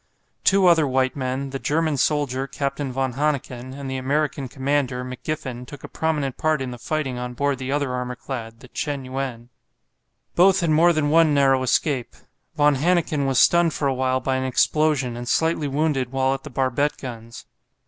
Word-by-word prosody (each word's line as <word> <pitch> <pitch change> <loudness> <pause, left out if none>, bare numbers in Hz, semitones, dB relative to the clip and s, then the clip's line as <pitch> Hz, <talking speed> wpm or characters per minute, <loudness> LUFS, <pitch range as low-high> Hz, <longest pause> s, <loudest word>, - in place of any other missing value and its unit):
Two 195 -1 +4
other 165 -4 +5
white 130 0 +1
men, 135 0 -3
the 135 - -4
German 155 +1 0
soldier, 135 -2 0
Captain 140 0 -3
von 130 0 -1
Hanneken, 130 -3 -2
and 140 -1 -6
the 130 0 -3
American 140 +1 -1
commander, 130 -1 -1
McGiffen, 130 -1 -5
took 145 - -11
a - - -6
prominent 150 -5 -2
part 155 -1 +1
in 130 -1 -4
the 120 - -8
fighting 135 -3 -2
on 125 0 -5
board 140 0 0
the 130 0 -4
other 145 -3 0
armour 125 0 -3
clad, 115 -4 -7
the 130 - -12
"Chen 140 +1 -4
yuen." 130 -2 -5 0.8
Both 190 +2 +5
had 170 -2 +1
more 165 +3 +5
than 155 -3 0
one 160 -2 +5
narrow 135 -2 +4
escape. 130 0 0 0.4
Von 145 -1 +4
Hanneken 155 -2 +1
was 135 -2 0
stunned 170 +2 +4
for 140 - 0
a 135 - +1
while 130 0 0
by 130 0 -1
an 130 - -2
explosion, 135 0 +1
and 120 0 -6
slightly 160 -2 +1
wounded 140 -3 0
while 135 0 +1
at 135 - -4
the 150 - -9
barbette 135 +2 0
guns. 115 -3 -9
135 Hz, 190 wpm, -23 LUFS, 130-150 Hz, 0.8 s, other